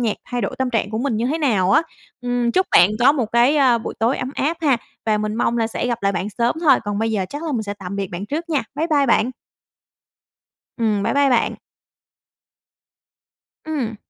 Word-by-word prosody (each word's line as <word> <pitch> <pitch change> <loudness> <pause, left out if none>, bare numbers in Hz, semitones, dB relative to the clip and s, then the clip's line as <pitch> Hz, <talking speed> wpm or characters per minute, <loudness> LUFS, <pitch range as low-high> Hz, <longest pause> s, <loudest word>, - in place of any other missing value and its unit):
nhạc 225 -4 0
thay 245 -1 -1
đổi - - -3
tâm 260 -1 0
trạng 225 -4 -1
của 220 - -3
mình 245 -3 -1
như 230 +3 0
thế 305 +5 -1
nào 210 - +2
á. 255 - +5 0.4
Ừm, 245 -1 -1
chúc 375 +6 +2
bạn 175 +3 +6
có 270 +4 +6
một 255 -7 -1
cái, 240 +5 +4
ơ, 260 -5 +4
buổi 225 - -6
tối 230 +4 +1
ấm 255 - -3
áp 310 +5 -1
ha 280 -5 +3 0.3
và 215 -1 +2
mình 215 0 -2
mong 235 +1 0
là 225 - +1
sẽ 230 +2 -3
gặp 240 -1 -1
lại 195 0 +2
bạn 190 - -2
sớm 235 0 +2
thôi. 315 - +5
Còn 205 0 -2
bây 225 0 0
giờ 200 -4 0
chắc 290 +2 -6
là 320 -2 -3
mình 230 -4 -1
sẽ 205 -1 -5
tạm 190 0 -6
biệt 200 -1 -2
bạn 175 +4 -5
trước 325 +7 -4
nha. 295 -4 +1
Bye 315 +3 -1
bye 290 -4 +2
bạn. 235 0 +2 1.5
Ừm. 215 -4 0
Bye - - 0
bye 280 0 +3
bạn. 245 -2 +1 2.1
Ừm. 270 -8 -3
240 Hz, 225 wpm, -20 LUFS, 215-280 Hz, 2.1 s, bạn